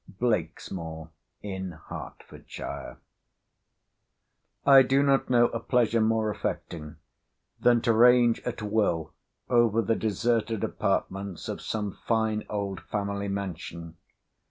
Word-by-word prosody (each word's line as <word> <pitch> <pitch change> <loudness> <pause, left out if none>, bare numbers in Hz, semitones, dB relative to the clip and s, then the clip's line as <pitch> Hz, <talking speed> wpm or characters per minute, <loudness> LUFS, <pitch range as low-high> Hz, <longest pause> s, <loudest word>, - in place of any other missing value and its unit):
BLAKESMOOR 85 -6 -2 0.3
IN 95 -4 -5 0.5
H—— - - -12
SHIRE - - -7 1.7
I 135 -1 +9
do 135 +2 +3
not 135 -1 +2
know 120 -1 +5
a 115 - -3
pleasure 115 -1 +2
more 110 -1 +2
affecting 80 -5 -5 0.6
than 120 -1 +4
to 115 - +2
range 120 0 +5
at 120 -3 -5
will 100 -7 0 0.3
over 120 -3 +3
the 115 +2 +1
deserted 110 +1 0
apartments 95 -2 -2
of - - -5
some 105 -2 -3 0.2
fine 110 -2 +1
old 100 -3 -3
family 100 -1 -3
mansion. 85 -4 -5
110 Hz, 110 wpm, -27 LUFS, 95-120 Hz, 1.7 s, I